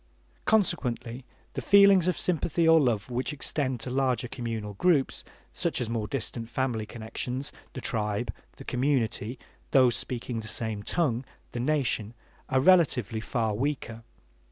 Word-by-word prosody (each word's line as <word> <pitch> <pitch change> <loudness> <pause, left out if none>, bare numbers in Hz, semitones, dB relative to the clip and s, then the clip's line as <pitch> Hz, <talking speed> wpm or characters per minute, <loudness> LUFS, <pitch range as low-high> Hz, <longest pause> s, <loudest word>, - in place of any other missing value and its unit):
Consequently 125 - +1 0.3
the - - -3
feelings 200 -3 +6
of 180 - +1
sympathy 170 -1 +1
or 165 -1 +7
love 120 -5 0
which 125 +4 -1
extend 135 -3 -2
to 125 - -4
larger 130 -2 +1
communal 115 -4 -4
groups, 145 - +2 0.3
such - - 0
as 115 -2 -2
more 110 -2 -1
distant 115 -3 -4
family 120 -3 -1
connections, 125 +4 -4 0.2
the 130 - -6
tribe, 105 -4 -1 0.2
the - - -11
community, 125 -3 0 0.3
those 130 -4 +5
speaking 120 0 -3
the 110 - -7
same 110 -1 -3
tongue, 130 - 0 0.3
the 120 - -4
nation, 120 -5 0 0.3
are 130 0 +3
relatively 135 - +4
far 110 0 -1
weaker. 120 -1 -3
125 Hz, 140 wpm, -28 LUFS, 115-145 Hz, 0.3 s, or